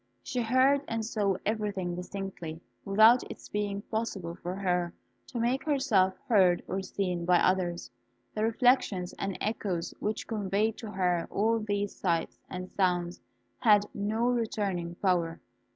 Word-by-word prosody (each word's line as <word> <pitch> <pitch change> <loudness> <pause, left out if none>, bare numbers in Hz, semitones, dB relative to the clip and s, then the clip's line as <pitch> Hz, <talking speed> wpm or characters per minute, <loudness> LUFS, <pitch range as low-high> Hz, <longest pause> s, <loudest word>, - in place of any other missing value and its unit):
She 250 - -2
heard 260 +4 +4
and 225 -1 -2
saw 205 -4 0
everything 205 -4 -1
distinctly, 180 -3 -6 0.3
without 220 +5 +6
its - - -10
being 205 -1 -2
possible 215 -7 -3
for 180 +1 -5
her 180 -3 0 0.3
to 245 - -5
make 245 +3 +1
herself 255 -11 +2
heard 185 -6 +4
or 195 - -2
seen 180 -2 -2
by 175 +1 +4
others. 180 -2 +1 0.4
The 215 - -1
reflections 225 -5 +2
and 195 -1 -2
echoes 195 -6 -2
which 215 +1 -2
conveyed 210 0 0
to 225 - -6
her 180 -4 0
all 225 +3 +1
these 205 -1 -2
sights 170 -3 -1
and 185 0 -6
sounds 175 -2 0 0.4
had 210 -2 +5
no 215 +3 -1
returning 200 -8 -1
power. 175 -3 0
200 Hz, 140 wpm, -29 LUFS, 180-220 Hz, 0.4 s, without